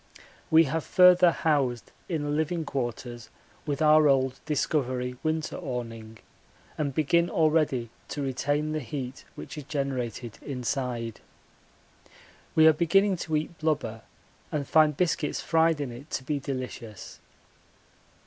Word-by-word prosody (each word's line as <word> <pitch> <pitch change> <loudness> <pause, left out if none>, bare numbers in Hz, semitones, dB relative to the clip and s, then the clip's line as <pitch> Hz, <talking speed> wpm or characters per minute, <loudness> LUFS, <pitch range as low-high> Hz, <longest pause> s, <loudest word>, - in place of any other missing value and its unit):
We 160 +1 +7
have 160 +2 -2
further 180 -1 +6
housed 140 -8 0 0.2
in 160 -4 -1
the 145 - -2
living 160 +2 -1
quarters 120 -3 -4 0.4
with 145 +2 -1
our 155 0 +6
old 130 -1 +2
Discovery 130 -4 -1
winter 155 0 -2
awning, 115 -6 -6 0.6
and 145 -2 -1
begin 170 +3 +2
already 150 -7 +1 0.2
to 145 - -4
retain 145 +3 -1
the 155 - -1
heat 130 0 -6
which - - -8
is 145 - -9
generated 130 -6 -3
inside. 125 -4 -3 1.4
We 160 - +6
are 160 - +8
beginning 185 +5 +3
to 160 -1 -2
eat 155 +2 -3
blubber 150 -8 -1 0.5
and 145 -3 -2
find 155 -2 +4
biscuits 165 -4 0
fried 165 -1 +2
in 140 -4 -3
it 130 +6 -11
to 135 - -12
be 145 +1 -2
delicious. 130 -6 -6
145 Hz, 130 wpm, -27 LUFS, 125-160 Hz, 1.4 s, are